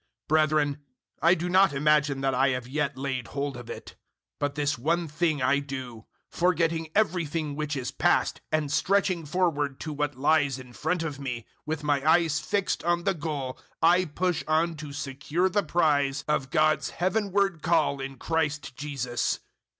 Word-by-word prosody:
003:013 - - -65
Brethren, 155 -2 +3 0.4
I 170 +3 +5
do 175 +1 -3
not 185 -1 +4
imagine 145 -1 +2
that 135 0 +1
I 135 +2 +3
have 125 -2 -2
yet 145 +1 -2
laid 130 -3 -3
hold 140 -1 -3
of 120 -1 -9
it. - - -8 0.4
But 145 -1 -1
this 145 0 0
one 165 +7 0
thing 155 -2 0
I 130 +2 +3
do 130 -5 -7 0.2
forgetting 165 -2 +1
everything 165 -7 0
which 150 0 -2
is 125 -2 -3
past - - +1
and 155 -2 0
stretching 185 0 +1
forward 145 -5 0
to 155 - -4
what 145 -1 -2
lies 145 -1 +2
in 130 -2 -11
front 160 +9 -1
of 145 -4 -4
me, 125 -4 -4
003:014 - - -28 0.2
with 155 -1 -3
my 145 0 +1
eyes 165 -3 +2
fixed 200 +1 -1
on 175 +1 +1
the 195 +1 +2
goal 145 -5 -4 0.2
I 175 +3 +4
push 175 +2 -1
on 160 +2 +2
to 150 -1 -7
secure 140 +6 -1
the 205 +2 +2
prize 145 -5 +1
of 140 -3 0
God's 155 -1 +2
heavenward 195 -2 0
call 155 -4 +2
in 135 0 -6
Christ 150 -3 -2
Jesus. 130 -4 -2
150 Hz, 175 wpm, -27 LUFS, 140-170 Hz, 0.4 s, I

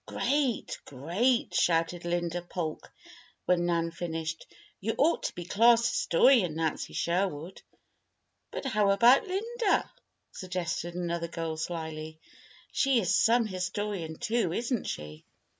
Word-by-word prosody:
"Great! 275 -5 -1
great!" 180 - 0
shouted 170 0 +1
Laura 175 0 -1
Polk, 170 -3 -5 0.5
when 175 -1 +2
Nan 165 -1 0
finished. 160 -1 -5 0.3
"You 225 +3 -2
ought 320 +4 +3
to - - -3
be 175 - -6
class 230 +5 +5
historian, 230 - +3
Nancy 160 -1 -2
Sherwood." 175 -1 -2 0.9
"But - - -6
how 215 -6 +2
about 235 - +5
Linda?" 435 +3 0 0.4
suggested 175 -2 -4
another 170 -1 -2
girl, 165 -1 -4
slily. 160 -1 -5 0.5
"She 270 -3 +3
is 185 -5 +1
some 235 +1 +4
historian, 185 -3 -3
too, 235 -6 0
isn't 235 +4 -1
she?" 75 +1 -6
180 Hz, 120 wpm, -29 LUFS, 165-230 Hz, 0.9 s, class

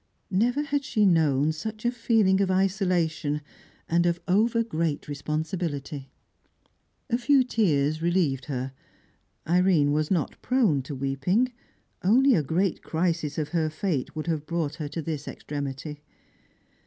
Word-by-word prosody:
Never 245 +9 +2
had 285 -1 -1
she 215 -5 +1
known 155 -5 +3
such 215 +8 -6
a 240 - +3
feeling 220 -5 +2
of 195 - +1
isolation, 180 -6 +1 0.5
and 170 +1 +2
of 170 0 0
over 225 +5 +3
great 165 -8 -2
responsibility. 150 -1 -3 1.0
A 235 - +2
few 265 +2 +4
tears 155 - +1
relieved 165 -6 +1
her. 130 -2 -3 0.8
Irene 175 -4 +3
was 150 +1 0
not 175 -7 -1
prone 225 - +2
to 135 +2 -7
weeping; 140 - 0 0.5
only 255 +8 +5
a 165 - +3
great 170 +5 0
crisis 165 -3 -1
of 150 -2 -2
her 160 -2 0
fate 155 -4 -2
would 155 - -4
have 160 -3 -2
brought 165 -4 -1
her 150 - -4
to 155 +2 -5
this 150 -2 -4
extremity. 145 +1 -5
165 Hz, 140 wpm, -26 LUFS, 150-200 Hz, 1.0 s, only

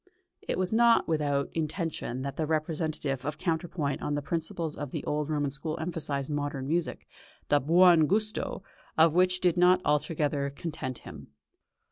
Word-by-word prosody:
It - - -3
was 185 +2 0
not 235 0 +5
without 145 -3 0
intention 155 -5 -3
that 140 -1 -4
the 155 -1 -2
representative 155 -3 -2
of 150 +2 -3
counterpoint 160 -3 -2
on 145 - -1
the 145 - -3
principles 165 0 -3
of 145 - -5
the - - -5
old 150 0 -2
Roman 145 -2 0
school 155 +3 -4
emphasised 155 -4 -3
modern 145 -2 -3
music, 170 +3 -2 0.4
the 145 - +5
"buon 170 +1 +5
gusto" 215 0 -1 0.3
of 160 0 +6
which 180 +1 +3
did 180 -2 +2
not 180 +1 +5
altogether 150 -1 0
content 140 -3 -5
him. - - -10
155 Hz, 155 wpm, -28 LUFS, 145-170 Hz, 0.4 s, of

